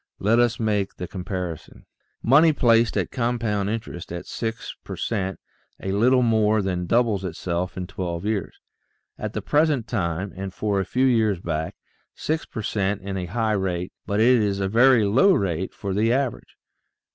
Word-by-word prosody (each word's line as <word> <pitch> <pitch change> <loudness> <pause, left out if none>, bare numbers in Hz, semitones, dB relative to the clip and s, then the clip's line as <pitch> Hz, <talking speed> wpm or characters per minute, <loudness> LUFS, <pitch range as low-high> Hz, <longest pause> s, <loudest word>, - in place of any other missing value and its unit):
Let 110 +4 +2
us 120 -2 +2
make 105 -3 0
the 90 - -6
comparison. 90 -3 -6 0.4
Money 155 +6 +6
placed 115 -4 +3
at - - -1
compound 115 -5 -1
interest 105 -7 -5
at 85 0 -5
six 115 -1 -5
per - - -6
cent, 95 -4 -2 0.4
a 95 - -3
little 125 +6 +4
more 110 -2 +3
than 90 -2 -2
doubles 115 -4 +2
itself 90 0 -3
in 90 - -3
twelve 90 -1 -4
years. 105 -2 -2 0.6
At - - -4
the - - -4
present 145 -6 +2
time 95 -3 -2
and 95 0 -5
for 100 +2 -1
a 95 - -1
few 130 +1 +1
years 110 -7 +2
back, 80 -2 -3 0.4
six 160 +1 -2
per 110 - -6
cent 100 -1 -1
is 100 - -3
a 90 -2 -3
high 110 +3 0
rate, 95 -3 -2
but 100 +1 0
it 120 +1 +5
is 100 -2 0
a 95 - 0
very 120 +2 +5
low 130 - +5
rate 95 -1 -1
for 100 -2 -5
the 110 +4 +2
average. 130 -1 -2
105 Hz, 175 wpm, -24 LUFS, 95-115 Hz, 0.6 s, Money